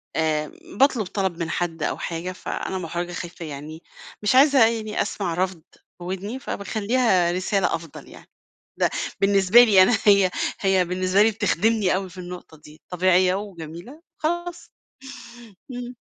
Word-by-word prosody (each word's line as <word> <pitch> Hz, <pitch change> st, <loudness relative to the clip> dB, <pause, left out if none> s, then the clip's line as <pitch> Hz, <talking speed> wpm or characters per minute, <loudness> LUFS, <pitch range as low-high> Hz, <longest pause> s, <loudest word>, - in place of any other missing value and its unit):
آآ، 155 Hz, -1 st, 0 dB, 0.3 s
باطلب 265 Hz, -6 st, +3 dB
طلب 190 Hz, -2 st, -2 dB
من 165 Hz, -1 st, -3 dB
حد 165 Hz, -2 st, -3 dB
أو -, -, -1 dB
حاجة 170 Hz, +2 st, -4 dB
فأنا 190 Hz, 0 st, -5 dB
مُحرجة 175 Hz, 0 st, -4 dB
خايفة 175 Hz, -1 st, -7 dB
يعني 155 Hz, +2 st, -8 dB, 0.4 s
مش 210 Hz, -, +2 dB
عايزة 270 Hz, -3 st, +6 dB
يعني 220 Hz, -2 st, -2 dB
أسمع 180 Hz, -5 st, -3 dB
رفض 180 Hz, -1 st, -2 dB
في -, -, -25 dB, 0.2 s
ودني 195 Hz, +7 st, -5 dB
فباخلّيها 200 Hz, -4 st, 0 dB
رسالة 190 Hz, +2 st, 0 dB
أفضل 165 Hz, -2 st, -10 dB
يعني، -, -, -15 dB, 0.5 s
ده -, -, +2 dB, 0.3 s
بالنسبة 200 Hz, +4 st, +6 dB
لي 200 Hz, -5 st, +6 dB
أنا 220 Hz, +2 st, +3 dB
هي 200 Hz, -3 st, +5 dB, 0.3 s
هي 190 Hz, -2 st, +2 dB
بالنسبة 185 Hz, +2 st, +1 dB
لي 225 Hz, -, +3 dB
بتخدمني 215 Hz, -2 st, +1 dB
أوي 190 Hz, -1 st, -3 dB
في 180 Hz, -, -16 dB
النقطة 175 Hz, -3 st, -9 dB
دي، 150 Hz, +1 st, -17 dB
طبيعية 185 Hz, +1 st, +3 dB
وجميلة 195 Hz, -, -8 dB, 0.2 s
خلاص. 345 Hz, +2 st, -3 dB, 1.0 s
إمم. 245 Hz, 0 st, -7 dB
185 Hz, 145 wpm, -23 LUFS, 175-215 Hz, 1.0 s, عايزة